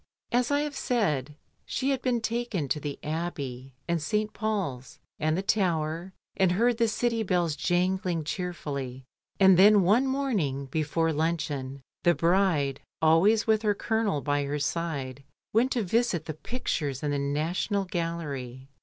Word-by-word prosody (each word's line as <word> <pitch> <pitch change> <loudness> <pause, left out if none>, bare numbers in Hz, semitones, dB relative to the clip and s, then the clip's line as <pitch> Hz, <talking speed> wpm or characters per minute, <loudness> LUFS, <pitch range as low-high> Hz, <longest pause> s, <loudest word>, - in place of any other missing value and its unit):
As 245 0 +2
I 285 0 +2
have 295 -1 -3
said, 150 - 0 0.3
she 270 +1 -1
had 265 -2 -1
been 245 -2 0
taken 225 -9 -2
to 150 - 0
the 145 -1 -5
Abbey 140 -5 -4
and 170 -2 0
St. 215 +5 -1
Paul's, 190 - -3 0.2
and 155 +1 +1
the 190 - -1
Tower, 175 -4 0 0.2
and 185 -2 +3
heard 235 +4 +2
the 230 - +4
city 230 +1 0
bells 175 -6 +1
jangling 180 -1 0
cheerfully, 145 -7 -4 0.4
and 190 -2 +7
tjien 205 +1 +7
one 215 +9 +3
morning 210 - -1
be 150 +4 -2
fore 165 +2 0
luncheon 150 -4 -2 0.2
the 175 -1 +4
bride 165 -6 +2 0.2
(always 180 +8 +4
with 220 -1 +3
her 210 -2 +1
Colonel 220 -8 0
by 145 0 0
her 145 +1 -2
side) 145 -3 -3 0.3
went 240 +5 +3
to 235 - 0
visit 195 -4 +1
the 155 - -4
pictures 150 - -3
in 145 - 0
the 145 - 0
National 165 +8 -1
Gallery. 145 -8 -4
170 Hz, 155 wpm, -28 LUFS, 145-215 Hz, 0.4 s, and